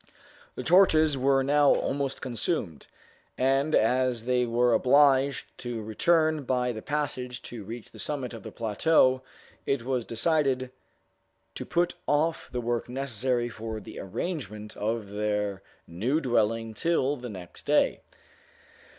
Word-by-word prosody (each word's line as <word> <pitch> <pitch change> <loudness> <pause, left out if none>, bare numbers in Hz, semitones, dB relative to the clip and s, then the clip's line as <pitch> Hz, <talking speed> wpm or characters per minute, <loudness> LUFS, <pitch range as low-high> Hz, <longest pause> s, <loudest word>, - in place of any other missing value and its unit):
The - - -5
torches 160 -4 +5
were 135 0 +2
now 145 +1 +4
almost 140 -1 -2
consumed, 120 - -2 0.5
and 135 +4 +2
as 125 0 +2
they 125 -1 +1
were 120 +1 +2
obliged 140 +1 +3
to 120 -2 -4
return 155 +7 +2
by 125 -1 0
the 110 -2 -6
passage 130 -4 -3
to 115 -4 -7
reach 115 +3 -8
the - - -13
summit 135 -5 -3
of 115 - -8
the - - -9
plateau, 130 +4 +2 0.5
it 135 -4 0
was 130 -2 -1
decided 130 +1 0 0.8
to - - -6
put 175 0 +1
off 155 +3 +1
the 125 - -2
work 120 0 -2
necessary 125 -1 -1
for 110 -1 -6
the 105 - -10
arrangement 105 - -5
of 110 0 -2
their 105 -1 -2 0.2
new 115 - -1
dwelling 115 -4 0
till 145 0 +1
the 125 -2 -7
next 90 -4 -10
day. - - +2
125 Hz, 135 wpm, -27 LUFS, 115-140 Hz, 0.8 s, torches